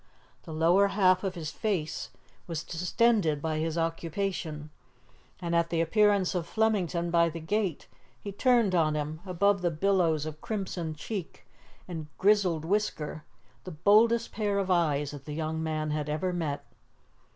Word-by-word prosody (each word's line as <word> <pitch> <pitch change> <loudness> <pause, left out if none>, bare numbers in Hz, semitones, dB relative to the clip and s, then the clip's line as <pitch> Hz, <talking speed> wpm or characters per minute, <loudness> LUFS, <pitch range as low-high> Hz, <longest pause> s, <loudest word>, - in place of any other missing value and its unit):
The 165 - -8
lower 170 +5 +4
half 185 -2 +3
of 190 -1 -2
his 155 -3 -5
face 180 -8 -2 0.4
was 165 -2 -4
distended 180 -2 +1
by 155 +1 -2
his 160 +1 -2
occupation, 165 -2 -3 0.7
and 170 -2 -2
at 170 0 +2
the 165 - 0
appearance 200 +2 +3
of 175 -3 -2
Flemington 180 -5 0
by 170 0 +4
the 165 +1 -6
gate, 185 0 -1 0.3
he 200 - -6
turned 235 -1 +3
on 155 -3 +2
him, 150 +1 -3
above 195 +2 +2
the 175 - +2
billows 165 -3 +1
of 155 -1 -7
crimson 185 -7 -4
cheek 190 +3 -6 0.4
and 160 -4 -6
grizzled 190 -6 +3
whisker, 165 -6 -1 0.4
the - - -7
boldest 215 +8 +3
pair 205 -2 -1
of 195 -1 0
eyes 150 -5 +1
that 145 -2 -10
the 150 - -6
young 160 0 -2
man 155 -1 -2
had 150 -1 -2
ever 155 +5 -1
met. 155 -5 -3
170 Hz, 155 wpm, -29 LUFS, 155-200 Hz, 0.7 s, lower